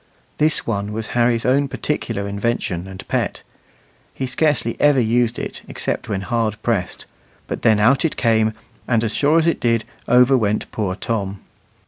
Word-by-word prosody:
This 155 0 +1
one 105 -2 -2
was 110 0 -4
Harry's 120 -1 +2
own 140 +2 +3
particular 115 -9 -3
invention 100 -4 -2
and 95 0 -9
pet; - - -2 0.7
he 135 - -2
scarcely 130 -2 0
ever 145 -2 +4
used 120 0 +1
it - - -5
except - - -3
when 95 -2 -1
hard 115 0 -1
pressed, 100 -7 -1 0.4
but - - -5
then 110 -2 +4
out 125 +6 +4
it 165 - -1
came, 110 -2 +2 0.3
and 115 -2 +2
as 110 -1 -1
sure 150 +3 +3
as 165 - +3
it 170 - +1
did, 115 -2 +1 0.2
over 125 +2 +5
went 105 -4 0
poor 100 -4 -2
Tom. 100 -2 -3
115 Hz, 165 wpm, -20 LUFS, 105-125 Hz, 0.7 s, over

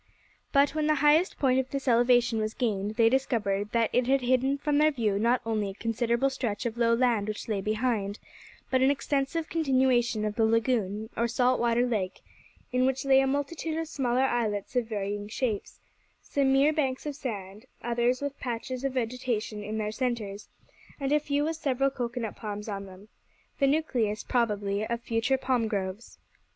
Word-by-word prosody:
But 280 0 +4
when 310 -1 0
the 305 - +3
highest 315 +5 +4
point 260 -2 +3
of 260 0 -2
this 275 -1 -4
elevation 240 -1 +4
was 215 0 -2
gained, 210 -4 -1
they 230 -1 +5
discovered 215 -5 0
that 230 -1 +1
it 250 0 +2
had 270 0 +3
hidden 255 +2 +2
from 290 0 +1
their 305 +1 +5
view 220 -8 0
not 235 +3 +2
only 215 -3 -1
a - - -6
considerable 235 +4 0
stretch 235 -4 -3
of 230 -1 -2
low 230 -1 +3
land 230 -4 +1
which 215 -1 -5
lay 210 -3 -1
behind, 215 -1 -1 0.5
but 260 -1 +3
an 265 - +5
extensive 285 +3 -1
continuation 255 -7 +2
of 210 - -1
the 225 - +3
lagoon, 220 -2 +1
or 235 - +1
salt 250 +2 +2
water 235 +1 +2
lake, 205 -6 -2 0.5
in 255 +1 +2
which 265 +1 -1
lay 270 -1 +6
a 270 - +2
multitude 295 +3 -2
of 325 0 -2
smaller 255 -3 0
islets 230 -4 -1
of 245 -2 +1
varying 205 -1 -3
shapes, 220 -1 -3 0.4
some 275 -2 +1
mere 275 +3 +4
banks 270 -4 -1
of 295 -1 -3
sand, 210 -4 -6 0.2
others 240 +2 +1
with 285 0 -4
patches 250 +1 -4
of 275 -1 -1
vegetation 230 -4 -2
in 215 +1 -4
their 210 -1 -2
centres, 220 -4 -3 0.5
and 275 -1 -2
a 300 - +4
few 290 0 -1
with 320 +1 -2
several 275 -3 +1
cocoa 245 -2 -4
nut 220 -2 -4
palms 210 -1 -6
on 200 -2 -5
them, 190 +2 -13 0.5
the 275 - +4
nucleus, 250 -8 0
probably, 205 -4 0
of 235 0 -2
future 235 +3 0
palm 255 -3 0
groves. 200 +1 -4
240 Hz, 185 wpm, -28 LUFS, 215-270 Hz, 0.5 s, lay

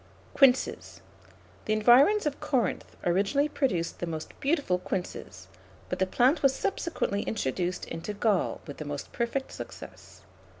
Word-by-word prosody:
[Illustration: - - -28
QUINCE.] 265 -2 +6
QUINCES. - - -10 0.6
The 215 - +1
environs 255 - +5
of 290 -1 -2
Corinth 240 -8 -1
originally 200 +12 +2
produced 240 - -1
the 175 - -3
most 160 -1 -5
beautiful 275 - +1
quinces, 100 - -5 0.4
but 180 - -3
the 190 - +2
plant 255 - +3
was 270 -1 +4
subsequently 320 - -1
introduced 180 -1 -2
into 165 +6 -6
Gaul 205 -3 +1
with 145 - -8
the 155 - -6
most 145 -1 -6
perfect 245 +3 -2
success. - - -10
210 Hz, 145 wpm, -28 LUFS, 175-270 Hz, 0.6 s, QUINCE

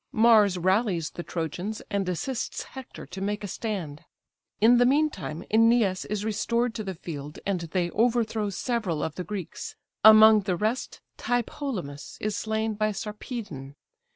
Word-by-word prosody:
Mars 215 -4 +5
rallies 185 -2 +1
the - - -6
Trojans, 175 +6 -4
and 200 -2 0
assists 240 +8 -3
Hector 265 -2 -10
to 190 +1 -8
make 205 +1 -2
a - - -3
stand. 180 -8 -4 0.6
In 240 +3 +6
the 245 - +5
meantime 280 - 0
Æneas 225 -4 +3
is 210 0 -2
restored 235 +2 0
to 215 - -4
the 190 -2 -5
field, 150 -3 -7
and 195 -2 0
they 175 +1 -1
overthrow 225 -2 +1
several 200 - -2
of 160 - -2
the 180 - -5
Greeks; 195 -3 -6 0.3
among 220 0 +9
the 190 -2 -1
rest 220 +8 -2 0.2
Tlepolemus 235 - -3
is 210 -1 -2
slain 220 +1 -1
by 215 0 0
Sarpedon. 210 - -6
210 Hz, 150 wpm, -26 LUFS, 180-225 Hz, 0.6 s, among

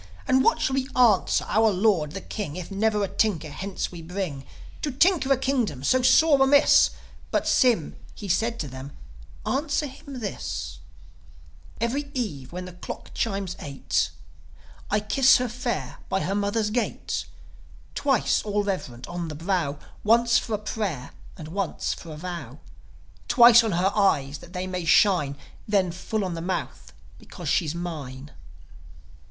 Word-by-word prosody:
And 260 0 +4
what - - +3
shall 265 - 0
we 265 -1 0
answer 230 -7 +4
our 220 +1 +3
Lord 185 -6 +1
the 195 - -5
King 165 -9 -5
If 180 +1 -7
never 210 +1 +1
a - - 0
tinker 175 -8 0
hence 190 +5 -4
we 175 -2 -8
bring, 165 -5 -5 0.3
To 300 - -1
tinker 295 +1 +2
a 270 - +5
kingdom 240 - -1
so 255 - +3
sore 285 +2 +5
amiss?" 285 +2 +6 0.4
But - - 0
Sym, 235 - +3 0.2
he 205 - -7
said 225 +6 0
to 150 - -4
them, 130 +2 -9 0.5
"Answer 290 +2 0
him 275 -1 -9
this: 210 -4 -5 1.0
'Every 275 +5 -1
eve, 155 - -4
when 180 +1 -6
the 185 - -9
clock 180 - -8
chimes 195 -4 -2
eight, 110 - -1 0.8
I 210 +1 +1
kiss 255 +5 +5
her 250 - -1
fair, 240 +1 -4
by 190 0 0
her 195 - -1
mother's 205 +1 0
gate: 240 +2 -2 0.7
Twice, 270 -5 +1
all 205 -1 -1
reverent, 155 -12 -4
on 175 -1 -5
the 155 - -6
brow 165 -3 -1 0.3
Once 235 +2 +4
for 220 - -3
a - - -1
pray'r, 200 - -4 0.3
and 155 -3 -8
once 195 +2 -2
for 165 - -10
a 155 - -8
vow; 160 -7 -6 0.7
Twice 240 -2 +8
on 220 -4 -1
her 185 +3 +2
eyes 145 -9 +1
that 175 - -14
they 180 0 -3
may 185 -1 -4
shine, 165 -5 +3 0.3
Then, 195 -4 +2
full 195 +4 -3
on 180 - -3
the 165 - -5
mouth 185 +2 -4 0.3
because - - -7
she's 165 -3 +1
mine."' 150 -5 -6
195 Hz, 160 wpm, -25 LUFS, 165-235 Hz, 1.0 s, Twice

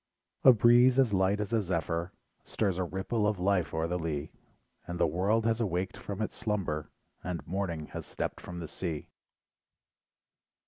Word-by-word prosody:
A 130 - +10
breeze 120 +2 +6
as 130 -6 +4
light 95 +2 +2
as 105 +2 -3
a 115 - +3
zephyr. 85 -1 -2 0.3
Stirs 95 -4 -1
a - - +1
ripple 100 +5 -1
of 105 -1 0
life 90 -1 +1
o'er 80 0 -1
the 90 +2 -1
lea, 80 -2 -3 0.6
And 85 0 -4
the - - +5
world 95 +8 +1
has 115 0 +1
awaked 95 -3 -1
from 100 +1 -4
its - - -4
slumber, 95 -9 -2 0.3
And 85 -5 -4
"Morning" 85 -4 -2
has - - -7
stepped - - -4
from 90 - -8
the 85 - -5
sea. 80 -1 -4
95 Hz, 170 wpm, -30 LUFS, 85-105 Hz, 0.6 s, A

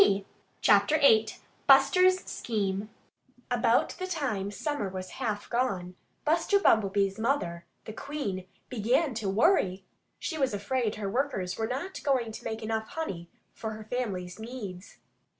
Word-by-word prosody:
VIII 195 0 +1 1.4
BUSTER'S 370 0 +6
SCHEME 205 -2 -2 0.6
About - - +3
the 370 - -3
time 265 - -2
summer 220 -1 -2
was 185 0 -6
half 215 -4 -2
gone, 200 -8 -1 0.3
Buster 335 +6 +3
Bumblebee's 200 - +3
mother, 175 -9 -1 0.2
the 220 - -7
Queen, 210 -10 -4 0.2
began 250 +5 +1
to 220 -3 -2
worry. 195 - +2 0.3
She 320 -4 -4
was 265 -6 +1
afraid 215 +2 -1
her 210 -2 -4
workers 195 -5 -1
were 220 - -1
not 280 +11 -4
going 255 -5 +1
to - - -9
make 220 0 -4
enough 220 0 -2
honey 185 - -5 0.2
for 220 -1 -5
her 215 0 -8
family's 210 -6 -3
needs. 220 -5 -8
220 Hz, 135 wpm, -29 LUFS, 195-265 Hz, 1.4 s, BUSTER'S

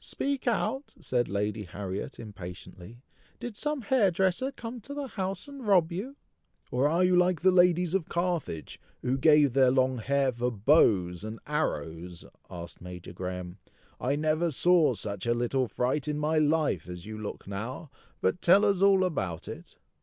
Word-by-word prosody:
speak 275 -2 -3
out!" 240 +4 -1
said 120 -4 -1
Lady 105 +2 -1
Harriet, 95 0 -6
impatiently, 100 +2 -10 0.4
"did 240 -3 -6
some 295 +3 -2
hair 225 -3 +3
dresser 190 +9 0
come 235 -2 -8
to 280 +7 -8
the 285 -2 -4
house 195 +5 -3
and 275 -5 -9
rob 180 -5 +4
you?" 215 +11 -5 0.6
"Or 130 +3 +2
are 170 +4 +2
you 180 0 +4
like 180 -2 +3
the 185 +1 +5
ladies 180 -1 +4
of 190 -5 0
Carthage 170 - -2 0.2
who 125 +1 +1
gave 150 -2 +5
their 130 -1 +5
long 130 -1 +2
hair 140 +3 +1
for 120 0 -1
bows 100 - +3
and 110 +1 -6
arrows?" 85 - -3 0.2
asked 85 0 -9
Major 90 -1 -9
Graham. 90 +1 -6 0.4
"I 135 +3 0
never 155 +3 +1
saw 165 -2 +4
such 100 +1 -4
a 120 - +2
little 120 +2 0
fright 130 +6 -1
in 150 -1 -1
my 155 +1 +1
life 150 - +1
as 90 -1 -8
you 110 0 -7
look 105 - -6
now; 115 +9 -6 0.3
but 180 - 0
tell 195 +4 +6
us 200 -2 +2
all 195 -1 +5
about 95 - -2
it?" - - -9
145 Hz, 170 wpm, -28 LUFS, -, 0.6 s, tell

